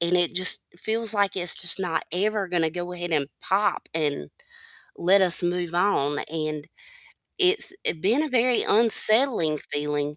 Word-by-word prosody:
and 170 +1 0
it 175 0 -1
just 185 0 +4
feels 225 +3 -3
like 200 -2 -1
it's 175 -2 -1
just 175 +2 -3
not 180 -3 -3
ever 200 +2 -2
gonna 170 -3 -1
go 175 +1 -7
ahead 175 -1 -7
and 145 -3 -1 0.2
pop, 205 +2 -1
and 150 -3 -4 0.7
let 190 +3 +2
us 180 -1 +6
move 175 -1 -3
on, 145 -6 0
and 155 -2 -5 0.7
it's 380 0 +4
it 160 - -4
been 225 - 0
a 315 - -3
very 250 -1 +1
unsettling 220 - +4
feeling, 145 0 -5
180 Hz, 160 wpm, -23 LUFS, 160-210 Hz, 0.7 s, us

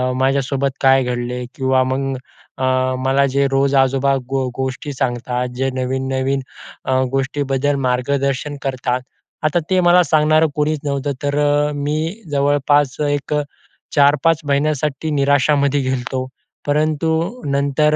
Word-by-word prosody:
माझ्यासोबत 135 +1 +1
काय 135 -1 +5
घडले 125 0 -3
किंवा 130 -1 +2
मग 135 +1 -2 0.4
अ, 130 - -3 0.4
मला 135 +1 +2
जे 140 +1 +1
रोज 135 +1 +2
आजोबा 135 +1 +3
गो 135 -1 0
गोष्टी 130 +2 -4
सांगतात, 125 -1 -2
जे 135 +1 0
नवीन, 130 +1 -2
नवीन 135 +1 0 0.5
अ, - - -1 0.2
गोष्टीबद्दल 135 +1 0
मार्गदर्शन 140 +3 -1
करतात, 125 -2 -1 0.4
आता 155 +3 +2
ते 185 -1 +3
मला 175 +1 +5
सांगणारं 155 +1 +3
कोणीच 150 0 0
नव्हतं, 140 0 -1
तर 145 0 0
अ, 145 0 +2
मी 155 +8 -2
जवळपास 145 0 +2
एक 145 +1 -2
अ, 150 - +2 0.5
4-5 150 +3 +4
महिन्यासाठी 150 +1 0
निराशामध्ये 140 0 +2
गेलो 130 0 0
होतो. 130 +1 -4 0.4
परंतु 160 - 0
नंतर 140 +2 +2
140 Hz, 130 wpm, -19 LUFS, 130-150 Hz, 0.5 s, काय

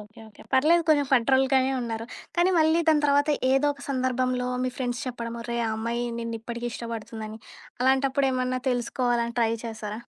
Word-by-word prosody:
Okay, 210 +2 -15
okay. 210 - -16
పర్లేదు 320 +6 +4
కొంచెం 290 -3 +4
federal 265 +2 +4
గానే 265 0 +3
ఉన్నారు. 225 -1 -4 0.3
కానీ, 350 +2 +4
మళ్ళీ 320 +2 +4
దాని 300 -1 +4
తర్వాత 285 +1 +3 0.2
ఏదో 270 +2 +3
ఒక 280 - -14
సందర్భంలో 255 -1 0 0.2
మీ 255 - 0
ఫ్రెండ్స్ 245 +1 -2
చెప్పడం, 235 -2 -5
ఒరేయ్! 235 0 -2
ఆ - - -1
అమ్మాయి 235 +2 -2 0.2
నిన్ను 230 0 -4
ఇప్పటికి 235 +1 -5
ఇష్టపడుతుందని, 220 -1 -6 0.4
అలాంటప్పుడేమన్నా 260 -1 +1
తెలుసుకోవాలని 240 -1 0
ట్రై 225 0 +2
చేసారా? 220 -1 -5
250 Hz, 160 wpm, -26 LUFS, 230-270 Hz, 0.4 s, పర్లేదు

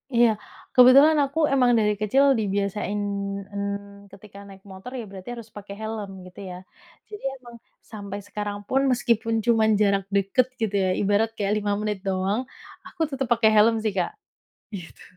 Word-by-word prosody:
Iya, 235 0 +6 0.5
kebetulan 275 +5 +7
aku 280 +4 -4
emang 250 -3 +4
dari 210 -1 +2
kecil 235 +7 +3 0.2
dibiasain, 205 0 -2 0.6
mhm, 200 0 -6
ketika 200 0 -14
naik 195 0 -15
motor 190 +5 -10
ya 235 - -5
berarti 190 +2 -10
harus 230 -1 -10
pakai 200 -1 -9
helm 220 -2 -5 0.2
gitu 180 - -13
ya. 180 - -7 0.5
Jadi 420 -1 -10
emang 240 -2 -14 0.4
sampai 200 -2 -6
sekarang 205 0 -4
pun 270 - +2
meskipun 230 -2 +1
cuma 225 -2 +3
jarak 200 -2 +2
dekat 200 +6 +2
gitu 215 -2 -1
ya, - - +1
ibarat 205 +2 +2
kayak 205 -1 0
5 205 0 -1
menit 210 -2 -3
doang, 195 +3 -1 0.5
aku - - -10
tetep 270 -2 -3
pakai 225 -2 +3
helm 215 +2 +5
sih, 215 - 0
Kak. 185 -3 -1 0.6
Gitu. 175 -4 -10
210 Hz, 160 wpm, -24 LUFS, 200-235 Hz, 0.6 s, kebetulan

